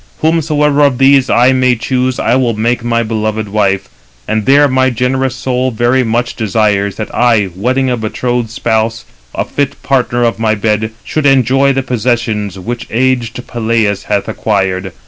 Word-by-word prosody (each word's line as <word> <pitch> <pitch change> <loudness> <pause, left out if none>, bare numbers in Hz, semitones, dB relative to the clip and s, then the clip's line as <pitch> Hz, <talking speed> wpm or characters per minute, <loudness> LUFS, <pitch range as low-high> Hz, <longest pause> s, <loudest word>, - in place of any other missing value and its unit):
Whomsoever 150 -2 +1
of 140 -3 +3
these 135 0 +4
I 125 +2 +4
may 130 -1 +2
choose, 125 +2 -1
I 115 - +1
will 125 -4 +1
make 115 +2 -1
my 115 0 0
beloved 110 -1 -2
wife; 100 -2 0 0.4
and 110 -1 -1
there 145 +2 +5
my 130 -1 +2
generous 130 +1 -1
soul 130 0 -1
very 120 +2 +1
much 120 +1 -1
desires 105 -2 0
that 110 - -6
I, 115 -5 +2
wedding 130 +7 0
a 125 - 0
betrothed 120 +1 -2
spouse, 115 0 -1 0.3
a - - -1
fit 140 -1 -3
partner 125 -2 0
of 115 -1 0
my 110 -1 +1
bed, 110 +1 -1
should 155 -2 -1
enjoy 135 +1 +3
the 135 0 -1
possessions 115 -5 -2
which 115 +6 -5
aged 125 0 -1
Peleus 110 -3 -1
hath 100 -1 -1
acquired. 95 -3 -1
120 Hz, 165 wpm, -13 LUFS, 110-130 Hz, 0.4 s, there